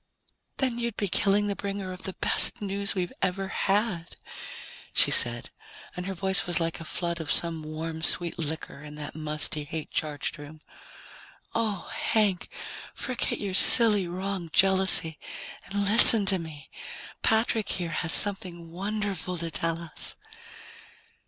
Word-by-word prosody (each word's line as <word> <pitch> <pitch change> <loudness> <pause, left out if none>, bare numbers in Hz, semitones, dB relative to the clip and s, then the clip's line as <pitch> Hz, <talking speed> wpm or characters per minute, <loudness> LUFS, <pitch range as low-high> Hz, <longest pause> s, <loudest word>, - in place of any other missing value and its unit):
"Then 250 -3 -1
you'd 235 -2 -4
be 205 - -1
killing 200 +2 +1
the 200 -1 -2
bringer 200 -2 -5
of 185 - -10
the 190 - -5
best 240 - +4
news 200 0 +1
we've 180 -2 -3
ever 190 +1 -2
had," 195 -5 -1 0.8
she - - +3
said, - - 0 0.4
and 180 +1 -6
her 195 - -5
voice 190 +1 +1
was 175 - +1
like 165 0 -3
a - - -8
flood 170 0 -4
of 155 - -4
some 165 -2 +2
warm 160 +1 -6
sweet 170 +1 +3
liquor 155 -3 -5
in 150 0 -11
that 150 -1 -8
musty, 150 -1 +1
hate 155 +1 -7
charged 150 +1 -3
room. 150 +2 -12 0.9
"Oh, 215 -5 -2
Hank, 205 -5 0 0.5
forget 255 -2 -2
your 200 -2 -4
silly, 210 -1 +8
wrong 185 0 -5
jealousy 190 -4 +2 0.5
and 200 0 -2
listen 215 0 +5
to 190 -1 +4
me. 155 -3 -11 0.5
Patrick 220 -1 +1
here 175 -2 -2
has 165 +1 -3
something 175 -5 0
wonderful 195 -1 -4
to 165 0 -5
tell 165 +1 -2
us." 160 - -5
185 Hz, 145 wpm, -26 LUFS, 165-200 Hz, 0.9 s, silly